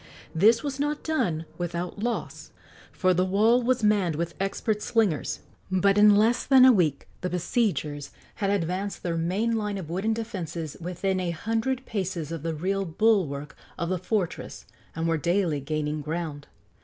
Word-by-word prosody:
This 220 +7 +4
was 280 -2 -4
not 295 +1 -1
done 170 - -1
without 175 +2 -3
loss, 235 +2 -4 0.4
for 185 0 +2
the 180 +1 +2
wall 215 +6 +3
was 250 -1 +1
manned 200 -6 +3
with 170 +2 -3
expert 205 +2 -1
slingers; 210 -11 0 0.3
but 190 +1 +3
in 210 0 +7
less 225 +4 +3
than 260 -2 +7
a 260 - +9
week 165 - +1
the 180 - -2
besiegers 170 - -1 0.3
had 200 - +1
advanced 195 +1 -2
their 170 -2 -1
main 190 +8 0
line 210 -2 -2
of 165 -4 -6
wooden 200 +6 0
defences 170 -8 -5
within 185 +2 -1
a 180 -1 -1
hundred 225 +9 -2
paces 185 -7 -3
of 165 -3 -4
the 165 0 -3
rear 195 +5 -1
bulwark 165 -6 +1 0.2
of 170 -1 -2
the 185 -1 0
fortress 185 -1 -3 0.3
and 165 +1 -1
were 165 -1 +1
daily 170 -2 +1
gaining 150 +1 -2
ground. 155 -1 -4
185 Hz, 165 wpm, -26 LUFS, 165-215 Hz, 0.4 s, a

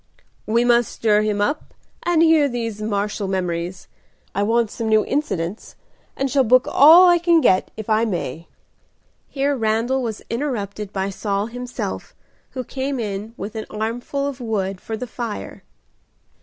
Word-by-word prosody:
"We 230 +2 +2
must 240 -1 +3
stir 210 -2 +2
him 210 -1 0
up 290 +9 -2 0.3
and 340 -2 +3
hear 320 -3 +5
these 230 -4 -4
martial 205 -1 -2
memories. 180 -1 -3 0.5
I 200 - -1
want 225 +1 +1
some 225 -2 -3
new 215 -1 +4
incidents, 205 - -3 0.4
and 275 - 0
shall 275 -2 +4
book 255 +2 +4
all 330 +6 +8
I 350 -1 +5
can 340 -1 +4
get, 185 -11 +3
if 220 - -6
I 220 0 +2
may." 170 - -4 0.8
Here 280 +1 0
Randal 230 +3 0
was 225 -4 -4
interrupted 215 -6 -3
by 195 0 -2
Saul 200 +1 -2
himself, 245 0 -5 0.4
who 255 - -4
came 270 +2 -3
in 210 +1 -4
with 200 +3 -6
an 220 -1 -5
armful 235 +6 -3
of 275 -2 -4
wood 195 -5 -2
for 220 - -5
the 250 - -4
fire. 235 -3 -6
225 Hz, 155 wpm, -21 LUFS, 205-260 Hz, 0.8 s, all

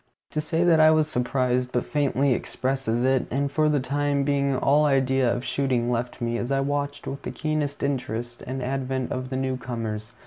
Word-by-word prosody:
To 155 - -1
say 165 +2 0
that 170 -2 +5
I 155 0 +7
was 155 -1 +3
surprised 125 -2 0
but 125 - 0
faintly 140 -2 +1
expresses 130 -2 -1
it, 130 0 +2
and 140 +2 -1
for 155 +1 +2
the 150 -1 +2
time 140 +2 0
being 140 -1 +1
all 145 +3 +3
idea 135 -3 +2
of 120 +2 -3
shooting 125 -3 0
left 120 +1 -2
me, 120 0 -1
as 120 - -3
I 135 - +2
watched 145 +1 -2
with 135 - -5
keenest 155 -2 -2
interest 120 -4 -3
the 130 0 -5
advent 130 -1 -2
of 130 0 -3
the 130 - -2
new 130 -1 -1
comers. 115 -3 -5
135 Hz, 195 wpm, -25 LUFS, 125-145 Hz, -, I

